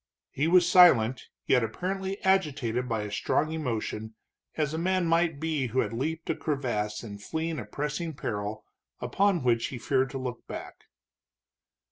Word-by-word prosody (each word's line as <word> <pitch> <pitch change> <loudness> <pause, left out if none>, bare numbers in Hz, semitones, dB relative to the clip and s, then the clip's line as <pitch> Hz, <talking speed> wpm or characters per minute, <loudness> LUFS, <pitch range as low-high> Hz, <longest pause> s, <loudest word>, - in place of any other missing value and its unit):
He 145 +4 0
was 175 0 +5
silent, 130 -11 +6 0.2
yet 125 -3 +4
apparently 190 - -3
agitated 135 - +1
by 110 -2 -1
a 105 - -6
strong 155 +8 0
emotion, 115 -7 -3 0.4
as 155 -1 0
a 160 - -2
man 185 +1 +1
might 165 -2 +2
be 155 -4 -1
who 125 +3 +1
had - - -3
leaped 160 +7 -3
a - - -1
crevasse 120 -8 -2
in 100 -3 -8
fleeing 160 +8 -3
a - - -6
pressing 150 +2 -3
peril, 110 -5 -4 0.3
upon 195 -6 +1
which 115 -2 +2
he 130 - -6
feared 130 +2 +1
to 135 - -5
look 125 -2 -5
back. - - -8
140 Hz, 160 wpm, -28 LUFS, 115-165 Hz, 0.4 s, silent